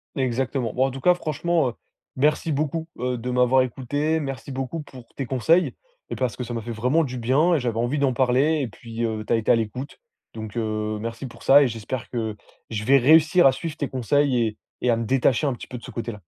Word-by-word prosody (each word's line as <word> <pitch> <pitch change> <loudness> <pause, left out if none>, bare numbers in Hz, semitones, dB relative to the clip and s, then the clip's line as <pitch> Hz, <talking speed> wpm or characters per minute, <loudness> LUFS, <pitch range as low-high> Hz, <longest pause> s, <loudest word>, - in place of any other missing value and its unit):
Exactement. 130 -2 -1
Bon, 130 +1 +2
en 135 - -1
tout 135 +1 -8
cas, 180 +4 +5
franchement, 160 -3 0
heu, - - -7 0.4
merci 150 +4 +1
beaucoup, 155 +3 -1
heu, 125 0 -1
de 120 +2 -5
m'avoir 125 +1 +4
écouté. 145 +6 -1
Merci 135 -1 -5
beaucoup 135 +4 -4
pour 130 -5 -13
tes 135 - -3
conseils 160 +8 +2 0.4
et - - -2
parce 125 -3 -1
que 125 - -4
ça 120 0 -6
m'a 115 - -3
fait 120 +2 -6
vraiment 125 +9 +1
du 125 -3 -5
bien 140 +9 +3
et 155 - +2
j'avais 120 -3 -2
envie 120 +5 0
d'en 140 -2 +2
parler 135 +5 +2
et 130 - -1
puis, 115 +1 -7
heu, 110 -2 -2
tu - - 0
as - - +5
été 110 - +1
à - - +6
l'écoute. 115 +5 -4 0.4
Donc, 110 -1 -7
heu, 110 -2 -2
merci 115 +3 -5
pour 125 - -11
ça 140 +2 +7
et - - +2
j'espère 120 +2 -5
que 110 -3 -3 0.3
je 105 -2 -3
vais 135 +4 +5
réussir 155 +4 +6
à - - +6
suivre 150 +4 -5
tes 145 - -2
conseils 130 +1 +1
et 110 - -6 0.2
et 125 - +1
à 115 - +3
me 115 - -2
détacher 135 +3 +2
un 135 - +1
petit 120 - -9
peu 125 - -7
de 120 - -13
ce - - -8
côté-là. 115 -5 -6
130 Hz, 240 wpm, -24 LUFS, 115-145 Hz, 0.4 s, ça